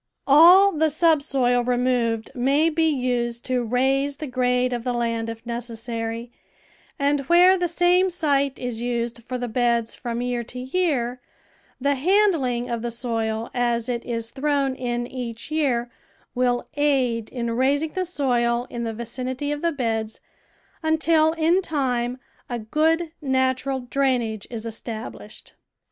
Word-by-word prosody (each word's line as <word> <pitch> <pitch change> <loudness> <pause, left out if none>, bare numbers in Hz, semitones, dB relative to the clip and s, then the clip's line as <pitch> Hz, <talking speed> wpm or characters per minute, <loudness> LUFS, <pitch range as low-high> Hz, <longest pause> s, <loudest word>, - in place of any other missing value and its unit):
All 350 +8 +7
the 315 -1 +1
subsoil 280 -6 +2
removed 245 -2 0
may 280 +5 +2
be 320 0 +2
used 245 -4 -1
to 255 -1 0
raise 270 +4 +1
the 305 - -5
grade 250 -1 +1
of 240 -1 -3
the 250 0 -1
land 230 -1 -1
if 225 +1 -8
necessary, 235 0 -4 0.7
and 285 0 +1
where 355 +2 +7
the 355 -1 0
same 355 +2 +3
site 280 -6 +1
is 245 -2 -4
used 235 -1 -2
for 255 +2 -4
the 245 0 -3
beds 235 -1 0
from 240 0 -4
year 245 -1 -1
to 235 +2 -9
year, 255 -4 -1 0.6
the 280 +2 +2
handling 285 - +2
of 235 -2 -3
the 240 - -2
soil 230 -1 -2
as 235 -2 0
it 240 -2 -2
is 230 -1 -4
thrown 280 -1 0
in 240 -2 -3
each 240 +1 -6
year 250 -6 0 0.4
will 245 -1 0
aid 260 -6 +1
in 235 -2 -3
raising 280 +6 +1
the 370 - -1
soil 245 -8 0
in 235 -1 -4
the 225 - -3
vicinity 255 +5 -4
of 295 0 -3
the 335 - +1
beds, 225 -6 -2 0.6
until 315 0 +3
in 335 +3 +2
time 255 -7 -1 0.3
a 240 - -2
good 315 +8 0
natural 260 -1 0
drainage 245 -5 -1
is 230 -2 -5
established. 225 -1 -7
250 Hz, 145 wpm, -23 LUFS, 235-290 Hz, 0.7 s, All